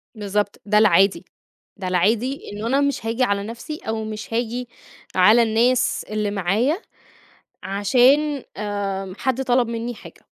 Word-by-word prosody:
بالضبط، 205 Hz, -1 st, -2 dB
ده 210 Hz, 0 st, +2 dB
العادي. 200 Hz, -2 st, +4 dB, 0.5 s
ده 190 Hz, -2 st, -5 dB
العادي 220 Hz, +9 st, +1 dB
إنه 210 Hz, +2 st, -5 dB
أنا 270 Hz, +4 st, +2 dB
مش 280 Hz, -5 st, -1 dB
هاجي 230 Hz, +3 st, 0 dB
على 200 Hz, -4 st, 0 dB
نفسي 235 Hz, +8 st, -7 dB
أو 220 Hz, 0 st, -2 dB
مش 215 Hz, 0 st, -7 dB
هاجي 240 Hz, +1 st, -2 dB, 0.5 s
على 215 Hz, +6 st, +6 dB
الناس 235 Hz, +3 st, +1 dB
اللي 210 Hz, -1 st, -1 dB
معايا 210 Hz, -, 0 dB, 0.8 s
عشان، 260 Hz, +8 st, +2 dB
آآ، 195 Hz, -2 st, -3 dB
حد 260 Hz, 0 st, -1 dB
طلب 245 Hz, -1 st, +2 dB
مني 235 Hz, +1 st, -4 dB
حاجة. -, -, -14 dB
220 Hz, 140 wpm, -22 LUFS, 205-250 Hz, 0.8 s, على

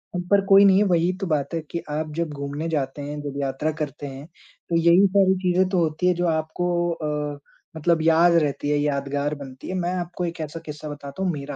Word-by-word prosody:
अब 180 Hz, 0 st, -3 dB
पर 200 Hz, 0 st, +6 dB
कोई 195 Hz, +1 st, +7 dB
नहीं 190 Hz, -1 st, +6 dB
है, 205 Hz, -, +5 dB
वही 175 Hz, -1 st, +2 dB
तो 195 Hz, -, -1 dB
बात 150 Hz, -2 st, -1 dB
है 165 Hz, -, 0 dB
कि 170 Hz, -, -2 dB
आप 155 Hz, +1 st, -3 dB
जब 170 Hz, -1 st, -1 dB
घूमने 140 Hz, +2 st, -4 dB
जाते 145 Hz, -2 st, -2 dB
हैं, 145 Hz, +1 st, -5 dB
जब 145 Hz, -1 st, -5 dB
यात्रा 140 Hz, +3 st, -1 dB
करते 145 Hz, -1 st, -4 dB
हैं 135 Hz, +1 st, -8 dB, 0.4 s
तो 170 Hz, -, 0 dB
यही 170 Hz, +4 st, +5 dB
सारी 190 Hz, 0 st, +4 dB
चीज़े 185 Hz, 0 st, +2 dB
तो 190 Hz, -, 0 dB
होती 165 Hz, +2 st, 0 dB
हैं 180 Hz, -, +3 dB
जो 175 Hz, 0 st, 0 dB
आपको 160 Hz, +2 st, -1 dB, 0.2 s
अ, 150 Hz, -3 st, -3 dB, 0.4 s
मतलब 165 Hz, +1 st, +2 dB
याद 165 Hz, +2 st, +5 dB
रहती 145 Hz, -3 st, +1 dB
हैं, 150 Hz, -, +2 dB
यादगार 145 Hz, 0 st, -1 dB
बनती 135 Hz, -2 st, -10 dB
हैं। 185 Hz, -, -3 dB
मैं 175 Hz, +1 st, -1 dB
आपको 175 Hz, 0 st, -3 dB
एक 170 Hz, 0 st, -5 dB
ऐसा 155 Hz, +2 st, -5 dB
किस्सा 150 Hz, 0 st, -7 dB
बताता 145 Hz, +4 st, -6 dB
हूँ 185 Hz, -, +1 dB
मेरा, 145 Hz, -2 st, -6 dB
155 Hz, 230 wpm, -23 LUFS, 145-175 Hz, 0.4 s, कोई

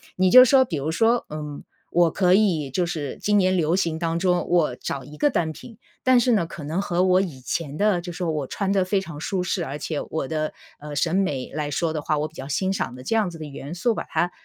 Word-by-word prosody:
你 185 Hz, 0 st, +3 dB
就 255 Hz, +3 st, +10 dB
说， 260 Hz, +1 st, +5 dB
比 180 Hz, -11 st, -4 dB
如 140 Hz, +2 st, -2 dB
说， 230 Hz, +8 st, +2 dB
嗯， 150 Hz, -1 st, -6 dB, 0.3 s
我 175 Hz, -1 st, +4 dB
可 180 Hz, 0 st, +3 dB
以 175 Hz, -9 st, +2 dB
就 175 Hz, +6 st, 0 dB
是， 155 Hz, -5 st, -4 dB
今 210 Hz, 0 st, +2 dB
年 185 Hz, -1 st, +3 dB
流 165 Hz, 0 st, +2 dB
行 165 Hz, -4 st, -1 dB
当 165 Hz, -1 st, -1 dB
中 180 Hz, 0 st, +1 dB
我 170 Hz, -7 st, +2 dB
找 135 Hz, -1 st, -4 dB
一 150 Hz, +3 st, -12 dB
个 290 Hz, -, +3 dB
单 165 Hz, -, 0 dB
品， 225 Hz, +7 st, -12 dB, 0.3 s
但 255 Hz, -1 st, +6 dB
是 250 Hz, -, +2 dB
呢， 195 Hz, -8 st, +2 dB
可 160 Hz, -, -9 dB
能 160 Hz, +6 st, -2 dB
和 180 Hz, -2 st, 0 dB
我 185 Hz, 0 st, +4 dB
以 165 Hz, -9 st, -4 dB
前 145 Hz, +2 st, -3 dB
的 205 Hz, 0 st, +2 dB
就 175 Hz, 0 st, -7 dB
说 170 Hz, -1 st, -2 dB
我 150 Hz, -4 st, -3 dB
穿 195 Hz, +6 st, -2 dB
得 195 Hz, -2 st, +2 dB
非 195 Hz, +1 st, +1 dB
常 165 Hz, -5 st, -8 dB
舒 180 Hz, +3 st, -2 dB
适， 180 Hz, -1 st, -1 dB
而 140 Hz, +1 st, -5 dB
且 150 Hz, 0 st, -3 dB
我 160 Hz, -4 st, -3 dB
的， 155 Hz, -1 st, -2 dB, 0.3 s
呃， 150 Hz, 0 st, -8 dB
审 165 Hz, +3 st, 0 dB
美 145 Hz, -10 st, -1 dB
来 150 Hz, 0 st, -2 dB
说 160 Hz, +3 st, -1 dB
的 155 Hz, -1 st, -3 dB
话， 155 Hz, +1 st, 0 dB
我 150 Hz, -, -1 dB
比 -, -, -29 dB
较 135 Hz, -4 st, -8 dB
欣 185 Hz, +7 st, 0 dB
赏 190 Hz, -10 st, -3 dB
的 125 Hz, -, -10 dB
这 225 Hz, -, 0 dB
样 210 Hz, -4 st, +1 dB
子 170 Hz, -, -9 dB
的 160 Hz, -, -7 dB
元 145 Hz, +2 st, -7 dB
素， 230 Hz, +7 st, +1 dB
把 -, -, -4 dB
它， 170 Hz, +3 st, -1 dB
170 Hz, 280 characters per minute, -24 LUFS, 150-190 Hz, 0.3 s, 就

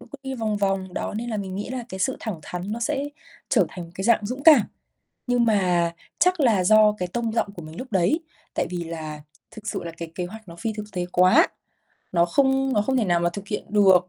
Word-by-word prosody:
cứ -, -, -13 dB, 0.2 s
đi 265 Hz, -1 st, -4 dB
vòng 220 Hz, -3 st, -1 dB
vòng. 195 Hz, -2 st, -1 dB
Đó -, -, -3 dB
nên 235 Hz, +2 st, -3 dB
là 215 Hz, -, -1 dB
mình 190 Hz, -2 st, -4 dB
nghĩ 205 Hz, -, -4 dB
là 255 Hz, -2 st, -4 dB
cái 190 Hz, -2 st, -7 dB
sự 260 Hz, +7 st, +1 dB
thẳng 215 Hz, -7 st, -4 dB
thắn 180 Hz, +6 st, -5 dB
nó 235 Hz, -, -4 dB
sẽ 280 Hz, +3 st, 0 dB, 0.4 s
trở 210 Hz, -9 st, +4 dB
thành 180 Hz, 0 st, -7 dB
một 165 Hz, -, -13 dB
cái 190 Hz, -, -4 dB
dạng 225 Hz, -2 st, +3 dB
dũng 255 Hz, +5 st, -5 dB
cảm. 300 Hz, -9 st, +9 dB, 0.6 s
Nhưng 245 Hz, -1 st, +3 dB
mà 180 Hz, -5 st, +2 dB, 0.3 s
chắc 365 Hz, -2 st, +3 dB
là 220 Hz, -9 st, +3 dB
do 215 Hz, +2 st, +6 dB
cái 180 Hz, -1 st, -2 dB
tông 230 Hz, +3 st, -2 dB
giọng 205 Hz, -3 st, 0 dB
của 175 Hz, -, -8 dB
mình 155 Hz, +1 st, -10 dB
lúc 255 Hz, -, -5 dB
đấy, 195 Hz, -, +2 dB, 0.3 s
tại -, -, 0 dB
vì 175 Hz, -1 st, -3 dB
là 155 Hz, -2 st, -6 dB, 0.3 s
thực 215 Hz, -1 st, -9 dB
sự -, -, -3 dB
là 170 Hz, -, -5 dB
cái 165 Hz, -1 st, -6 dB
kế 180 Hz, -, -3 dB
hoạch 220 Hz, +2 st, -11 dB
nó 170 Hz, -, -10 dB
phi 220 Hz, +6 st, -2 dB
thực 210 Hz, -1 st, -5 dB
tế 180 Hz, -1 st, -2 dB
quá, 185 Hz, -, +6 dB, 0.7 s
nó 170 Hz, -1 st, +4 dB
không 270 Hz, +6 st, +2 dB
nó 210 Hz, -, +3 dB
không 260 Hz, +5 st, 0 dB
thể 235 Hz, -, +2 dB
nào 175 Hz, -3 st, +2 dB
mà 175 Hz, 0 st, +1 dB
thực 200 Hz, +2 st, -7 dB
hiện 210 Hz, -, -3 dB
được. 190 Hz, -4 st, +5 dB
205 Hz, 250 wpm, -24 LUFS, 180-235 Hz, 0.7 s, cảm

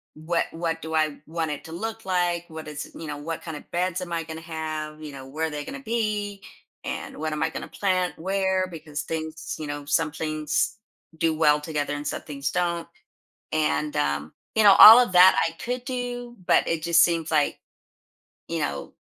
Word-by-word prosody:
"What 165 Hz, +2 st, 0 dB
what 165 Hz, -1 st, -3 dB
do 160 Hz, 0 st, -6 dB
I 155 Hz, -2 st, 0 dB
want 160 Hz, -1 st, -2 dB
it 145 Hz, -, -5 dB
to 160 Hz, -, -10 dB
look 225 Hz, +6 st, -5 dB
like? 175 Hz, -2 st, 0 dB
What 160 Hz, -1 st, -8 dB
is 150 Hz, -1 st, -6 dB
you 165 Hz, -, -7 dB
know, 150 Hz, -, -4 dB
what 160 Hz, +2 st, -5 dB
kind 160 Hz, -3 st, -6 dB
of -, -, -14 dB
beds 180 Hz, +1 st, -1 dB
am 175 Hz, -, -6 dB
I 165 Hz, -1 st, -1 dB
going 160 Hz, 0 st, -7 dB
to 160 Hz, -, -10 dB
have, 155 Hz, -1 st, -5 dB
you 150 Hz, -, -7 dB
know, 135 Hz, -1 st, -9 dB
where 155 Hz, +4 st, -2 dB
are -, -, -5 dB
they 150 Hz, -1 st, -5 dB
going 280 Hz, -, -6 dB
to -, -, -16 dB
be? 210 Hz, -4 st, -2 dB, 0.4 s
And -, -, -5 dB
what 155 Hz, 0 st, -2 dB
am 150 Hz, -, -1 dB
I 160 Hz, -, +1 dB
going -, -, -6 dB
to -, -, -16 dB
plant 185 Hz, -2 st, +1 dB
where?" 190 Hz, +1 st, 0 dB
Because 155 Hz, -3 st, -6 dB
things 160 Hz, 0 st, -5 dB
you 155 Hz, -, -5 dB
know, 145 Hz, 0 st, -5 dB
some 155 Hz, +2 st, +1 dB
things 155 Hz, +2 st, -1 dB, 0.4 s
do 165 Hz, 0 st, +2 dB
well 150 Hz, -1 st, +4 dB
together 150 Hz, -2 st, -2 dB
and 145 Hz, 0 st, -5 dB
some -, -, -3 dB
things 140 Hz, -2 st, -4 dB
don't. 170 Hz, -1 st, -1 dB, 0.7 s
And, 150 Hz, -1 st, 0 dB
um, 75 Hz, +1 st, -1 dB, 0.2 s
you 220 Hz, -, +4 dB
know, 200 Hz, -1 st, +9 dB
all 225 Hz, +3 st, +13 dB
of 245 Hz, -6 st, +3 dB
that 180 Hz, +1 st, +8 dB
I 165 Hz, -, -3 dB
could 245 Hz, +1 st, -3 dB
do, 245 Hz, -2 st, -4 dB
but -, -, +4 dB
it 165 Hz, -1 st, -1 dB
just 170 Hz, 0 st, +5 dB
seems 165 Hz, -2 st, +1 dB
like, 150 Hz, -2 st, +2 dB, 0.9 s
you -, -, -2 dB
know, -, -, -3 dB
165 Hz, 215 wpm, -25 LUFS, 155-185 Hz, 0.9 s, all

